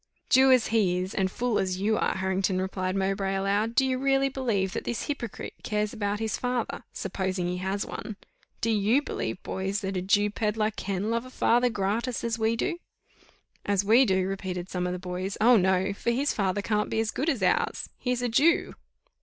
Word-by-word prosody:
"Jew 265 +1 +6
as 255 -3 +4
he 200 -6 +2
is, 185 +1 -3
and 190 -1 +1
fool 240 +2 0
as 185 -1 -1
you 215 +3 +2
are, - - 0
Harrington," 190 0 0
replied 185 0 -2
Mowbray, 195 0 0
aloud, 200 +4 0
"do 265 - +4
you 260 -1 0
really 275 0 +2
believe 225 -8 -1
that - - -3
this 240 - -3
hypocrite 280 -6 -5
cares 210 0 -1
about 205 -2 -2
his 220 -1 -2
father, 245 -1 -2
supposing 185 -1 -2
he 180 0 -2
has 190 +2 -2
one? 215 - -7 0.4
Do 230 - +1
you 220 +7 +3
believe, 115 - -4
boys, 195 +2 -2
that 195 -1 -3
a 185 - -1
Jew 205 +2 +2
pedlar 215 0 0
can 200 0 -3
love 230 0 0
a - - -11
father 245 -1 +2
gratis, 225 +4 -1
as 230 0 -1
we 220 +1 +2
do?" 340 +9 -2 0.8
"As 200 -1 +1
we 230 +6 +6
do!" 190 -5 +2
repeated 190 -2 -4
some 180 -1 -1
of 180 - -2
the - - -3
boys: 185 +2 -4
"Oh! 240 +3 +6
no, 190 0 +2
for 200 - -2
his 265 +5 +1
father 200 0 0
can't 210 -1 0
be - - -1
as 225 -1 0
good 295 +5 -1
as 245 -10 -1
ours 180 - +1
he 250 - -1
is 250 0 -1
a 245 - +1
Jew!" 305 +9 +3
205 Hz, 210 wpm, -27 LUFS, 190-235 Hz, 0.8 s, Jew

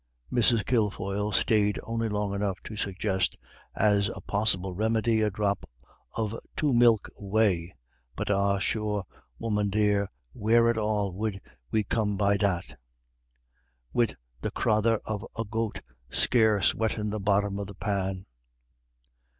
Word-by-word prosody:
Mrs. 115 -2 +3
Kilfoyle 105 -3 0
stayed 105 +1 +2
only 115 0 -2
long 105 -1 -1
enough 100 -2 -1
to 110 - -7
suggest, 95 -2 -1 0.4
as 100 -1 +3
a - - -6
possible 95 -3 0
remedy, 110 +2 +1
a 105 - +3
drop 100 0 -1 0.5
of 110 -2 -1 0.2
two 145 -3 +2
milk 120 -3 +5
whey. 100 -4 +1 0.4
"But - - -2
ah, 100 0 +2
sure, 105 0 -1 0.3
woman 105 - 0
dear, 105 -1 +2 0.2
where 115 +1 +3
at 115 - -3
all 105 -3 0
'ud 105 -3 -1 0.3
we 110 - +1
come 105 -1 0
by 100 0 +3
that, 90 -9 -1 1.1
wid 115 -3 +2 0.3
the - - -1
crathur 110 0 +2
of 105 -1 -3
a 115 - -1
goat 110 +1 -3 0.3
scarce 110 -5 +3
wettin' 110 -2 -1
the 110 - -2
bottom 100 0 +1
of 100 - -4
the 100 - -10
pan?" 95 -1 -2
105 Hz, 135 wpm, -28 LUFS, 100-110 Hz, 1.1 s, milk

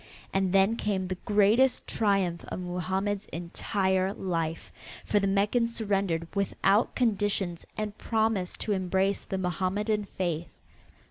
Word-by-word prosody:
And 195 -1 +1
then 195 +4 +4
came 195 -4 -1
the 185 0 -3
greatest 215 +5 +4
triumph 195 -5 +1
of - - -5
Mohammed's 190 +3 -2
entire 190 +3 -1
life, 165 -3 -3 0.3
for 210 - +2
the 200 - +1
Meccans 210 +4 +1
surrendered 195 -6 0
without 200 +2 +2
conditions 205 -6 0
and 210 -1 -3
promised 220 -5 0
to 215 - -1
embrace 190 0 +1
the 190 - -4
Mohammedan 195 +4 -1
faith. 175 -4 -3
195 Hz, 125 wpm, -28 LUFS, 185-210 Hz, 0.3 s, then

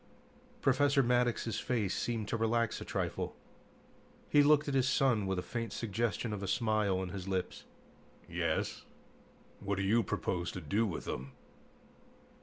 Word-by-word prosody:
Professor 140 +1 +4
Maddox's 120 -2 +1
face 110 -7 0
seemed 115 -3 -2
to - - 0
relax 115 0 +1
a - - -3
trifle. - - -2 0.9
He 145 - +6
looked 150 +1 +5
at 140 - -1
his 130 -1 +3
son 120 -6 +2
with 95 -1 0
a 90 - -2
faint 115 -3 -4
suggestion 115 0 -1
of 100 - -4
a 100 - -3
smile 110 -3 +1
on 95 -1 -3
his 95 +1 -6
lips. 95 -1 -3 0.6
"Yes? - - -1 0.8
What 100 0 -2
do 100 - -1
you 110 +4 +4
propose 90 -3 -2
to - - -4
do 100 +8 +1
with 90 - -4
them?" 65 +2 -5
110 Hz, 155 wpm, -33 LUFS, 95-125 Hz, 0.9 s, He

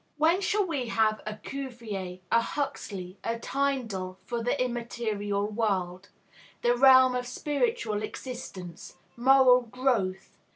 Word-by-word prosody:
When 330 +5 +3
shall 410 +1 +1
we 285 -8 -2
have 220 -1 +1
a 215 - -3
Cuvier, 215 -8 -6
a 230 - +5
Huxley, 205 -9 -4
a 230 0 -1
Tyndall 230 -9 -2
for 235 -1 -3
the 245 +4 0
immaterial 230 -5 -2
world, 195 -4 -2 0.5
the 240 0 +4
realm 260 0 +7
of 250 0 -2
spiritual 295 - -1
existence, 205 -7 -7 0.2
moral 255 0 +6
growth? 225 -6 -1
235 Hz, 120 wpm, -28 LUFS, 205-265 Hz, 0.5 s, realm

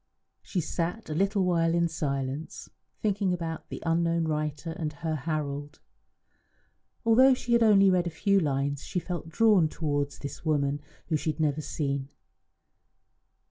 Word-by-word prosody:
She 180 - -2
sat 170 +4 -3
a - - -1
little 195 +3 +1
while 165 -2 +2
in 170 0 +3
silence, 140 -2 -4 0.3
thinking 200 -3 +1
about 165 -2 -4
the - - -7
unknown 165 0 +2
writer 150 +1 -2
and 160 -2 -3
her 155 +1 -3
Harold. 145 -1 -3 1.3
Although 255 +4 +6
she 245 -1 -2
had 235 - +5
read 225 - +6
only 195 -1 +6
a 180 -2 +2
few 195 +5 +2
lines, 140 -3 -1
she - - -4
felt 175 -2 -5
drawn 200 -3 +4
towards 145 -3 -2
this 140 - -7
woman 145 -2 0 0.2
whom 155 -2 0
she 160 - -2
had - - -19
never 155 -1 +1
seen. 140 -3 -3
160 Hz, 150 wpm, -28 LUFS, 145-180 Hz, 1.3 s, Although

